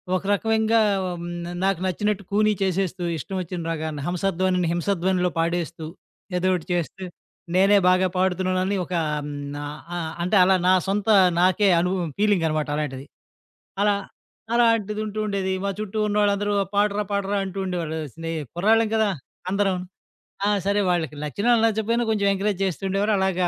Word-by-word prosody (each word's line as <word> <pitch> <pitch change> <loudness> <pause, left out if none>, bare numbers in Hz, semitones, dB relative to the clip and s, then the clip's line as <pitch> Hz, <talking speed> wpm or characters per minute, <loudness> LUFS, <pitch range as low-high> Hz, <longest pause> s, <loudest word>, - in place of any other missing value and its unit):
ఒక 185 - -2
రకమంగా 220 +2 +2 0.3
హ్మ్, 175 -1 -5 0.4
నాకు 195 -3 +1
నచ్చినట్టు 205 +2 -1
కూనీ 215 +1 +4
చేసేస్తూ. 190 -1 -1
ఇష్టం 190 +6 -6
వచ్చిన 175 0 -5
రాగాని 155 -2 -4
హంసధ్వనిని 180 0 0
హింసధ్వనిలో 180 0 0
పాడేస్తూ. 165 -1 -2 0.5
ఏదోకటి 180 -1 0
చేస్తే. 175 +2 -3 0.5
నేనే 195 +2 +5
బాగా 185 +1 +4
పాడుతున్నానని 185 +1 +1
ఒక - - -7 0.3
హ్మ్ 145 - -5 0.6
ఆహ్, 165 -2 -3
అంటే 180 +4 +1
అలా 190 +1 +4
నా 185 - +6
సొంత 205 +2 -1 0.3
నాకే 185 +3 +3
అనుభవం 180 -1 -1
ఫీలింగనమాట 165 -8 +1
అలాంటిది. 140 -3 -4 0.8
అలా 205 0 +4 0.6
అలాంటిది 230 -3 +2
ఉంటూ 215 0 -6
ఉండేది. 195 -2 -1
మా 200 - 0
చుట్టూ 215 0 -4
ఉన్నోళ్ళందరూ 205 0 +1
'ఆ - - -1
పాడరా 205 0 +2
పాడరా' 200 0 0
అంటూ 190 0 -6
ఉండేవాళ్ళు. 165 -3 -3
స్నేయి 165 -1 -4
కుర్రాళ్ళం 220 +5 +3
కదా! 220 -2 +2 0.4
అందరం. 195 -1 +1 0.7
ఆ! - - +3 0.2
సరే 200 +1 +2
వాళ్ళకి 165 -5 0
నచ్చినా 200 +11 0
నచ్చకపోయినా 225 +2 +1
కొంచెం 205 -2 +1
ఎంకరేజ్ 195 0 -1
చేస్తూండేవారు. 195 +3 0
అలాగా 185 -2 +1
190 Hz, 140 wpm, -24 LUFS, 175-205 Hz, 0.8 s, నా